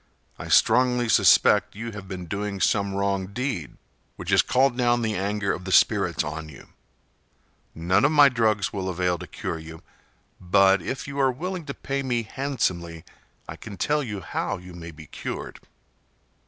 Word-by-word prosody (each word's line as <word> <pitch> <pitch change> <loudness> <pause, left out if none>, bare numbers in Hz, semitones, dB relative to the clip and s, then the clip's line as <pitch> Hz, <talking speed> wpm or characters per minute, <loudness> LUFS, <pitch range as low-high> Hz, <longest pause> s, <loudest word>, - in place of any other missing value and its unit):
I - - -7
strongly 125 +1 +3
suspect 100 -6 +4
you 115 +2 -6
have 100 -2 -9
been 95 -2 -6
doing 100 +3 -4
some 100 0 +1
wrong 100 -1 -1
deed 100 - -4 0.4
which - - -5
has - - +6
called 130 0 +2
down 120 -1 +1
the 110 -1 0
anger 100 0 -1
of 90 - -6
the 95 - -5
spirits - - +3
on 80 +1 -6
you. 70 - -14 1.1
None 90 +5 +1
of 145 - +4
my 145 -2 +7
drugs 110 -5 +1
will 95 -2 -3
avail 90 -1 -1
to - - -8
cure 80 - -5
you, 80 +1 -11 0.6
but 95 +2 +4
if 130 +1 -5
you 140 0 -5
are 135 -1 +3
willing 175 +5 -5
to 140 - -6
pay 140 0 -3
me 120 -3 -1
handsomely 90 - -3 0.4
I - - -7
can 100 -2 -10
tell 150 +7 +1
you 105 -7 -5
how - - -3
you 90 0 -12
may 85 -1 -9
be 80 -1 -12
cured." - - -7
100 Hz, 175 wpm, -25 LUFS, 90-125 Hz, 1.1 s, my